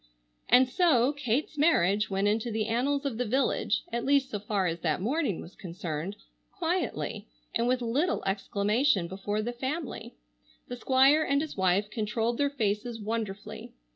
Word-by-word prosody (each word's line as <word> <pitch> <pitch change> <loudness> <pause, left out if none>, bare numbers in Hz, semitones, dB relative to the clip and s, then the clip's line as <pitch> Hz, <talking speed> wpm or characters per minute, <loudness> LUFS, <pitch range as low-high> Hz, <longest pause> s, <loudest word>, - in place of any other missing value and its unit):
And 255 +1 +6
so 280 -4 +3
Kate's 285 +2 -2
marriage 210 - +3
went 195 +1 0
into 220 +3 0
the 220 -1 -1
annals 275 +6 0
of 245 -5 -2
the - - +2
village, 260 +5 0
at 235 0 -1
least 275 -1 +2
so 205 - -2
far 205 -2 -1
as 170 -1 -1
that 160 -2 0
morning 245 - -1
was 175 - -11
concerned, 170 0 -5 0.4
quietly, 330 - -2 0.3
and 235 +1 +1
with 250 0 +1
little 270 +10 0
exclamation 200 +2 +1
before 205 +3 -3
the 240 +2 -3
family. 260 -2 -5 0.5
The 245 - -6
Squire 270 +4 +4
and 280 -2 +2
his 310 0 -4
wife 190 +2 +1
controlled 225 +2 -1
their 285 0 +3
faces 225 -2 -2
wonderfully. 215 +1 -5
230 Hz, 160 wpm, -28 LUFS, 205-270 Hz, 0.5 s, And